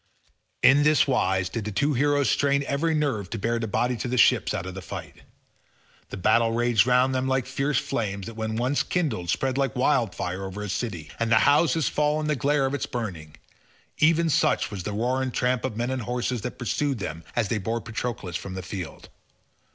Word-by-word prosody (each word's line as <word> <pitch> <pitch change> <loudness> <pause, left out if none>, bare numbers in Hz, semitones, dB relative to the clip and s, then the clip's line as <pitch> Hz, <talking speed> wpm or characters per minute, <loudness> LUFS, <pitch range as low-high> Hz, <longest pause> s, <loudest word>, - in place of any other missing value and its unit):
In 140 +2 +7
this 150 +1 +4
wise 95 -8 +1
did 110 +4 -4
the 105 - -4
two 145 +8 +1
heroes 145 +1 +2
strain 140 0 +2
every 155 +4 0
nerve 135 - -1
to - - -4
bear 115 +3 -1
the 115 - -2
body 125 +4 0
to 115 - -4
the 125 +1 -1
ships - - +4
out - - -3
of 95 - -6
the 95 - -7
fight. - - -8 0.9
The - - -6
battle 115 +4 +3
raged 120 -2 +3
round 125 +1 +3
them 130 0 0
like 130 -1 +1
fierce 135 +1 -1
flames 100 -8 -2
that 115 - -7
when 110 0 -3
once 125 +5 +1
kindled 120 - -2
spread 135 +6 0
like 135 0 0
wildfire 95 -8 0
over 95 +2 -5
a 105 - -5
city, 95 -8 -4
and 115 0 0
the - - +6
houses 160 +1 +3
fall 150 +1 +1
in 155 - -2
the 150 0 +1
glare 140 +1 +1
of 135 - -1
its 145 - -2
burning—even 115 - -2
such - - +2
was 100 -3 -5
the 105 - -4
roar 125 +5 0
and 130 -2 -3
tramp 125 0 +1
of 125 -5 -3
men 120 +2 -1
and 130 -1 -2
horses 125 0 -2
that - - -5
pursued 135 +4 -1
them 80 -4 -5
as 115 -4 0
they 110 - 0
bore 115 +4 -2
Patroclus 110 -6 -5
from 95 +1 -5
the 95 - -5
field. 90 -2 -7
120 Hz, 210 wpm, -25 LUFS, 105-135 Hz, 0.9 s, In